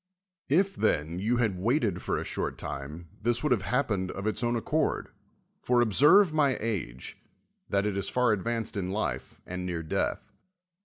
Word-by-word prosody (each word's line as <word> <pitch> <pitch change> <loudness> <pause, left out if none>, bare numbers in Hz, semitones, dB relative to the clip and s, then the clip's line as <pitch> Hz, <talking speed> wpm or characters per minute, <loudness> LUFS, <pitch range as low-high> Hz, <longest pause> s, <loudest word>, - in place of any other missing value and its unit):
If, 190 +6 +3
then, 80 +3 0
you 115 +5 +1
had 110 -7 0
waited 110 - +1
for - - -1
a - - -2
short - - -3
time, 75 +5 -7
this 120 +3 0
would 150 - +1
have 115 -5 +3
happened 100 -4 0
of 95 +2 -5
its 110 +3 -1
own 120 0 +1
accord; 150 +6 0 0.5
for 125 0 +2
observe 150 - +5
my 145 -4 +3
age, 90 - -4 0.5
that 100 0 +1
it 105 -2 -1
is 100 -1 -2
far 125 -2 +2
advanced 115 +3 -2
in 95 -2 -2
life, 105 +3 -3
and 90 0 -5
near 85 -2 -3
death. 80 - -2
110 Hz, 170 wpm, -28 LUFS, 90-125 Hz, 0.5 s, observe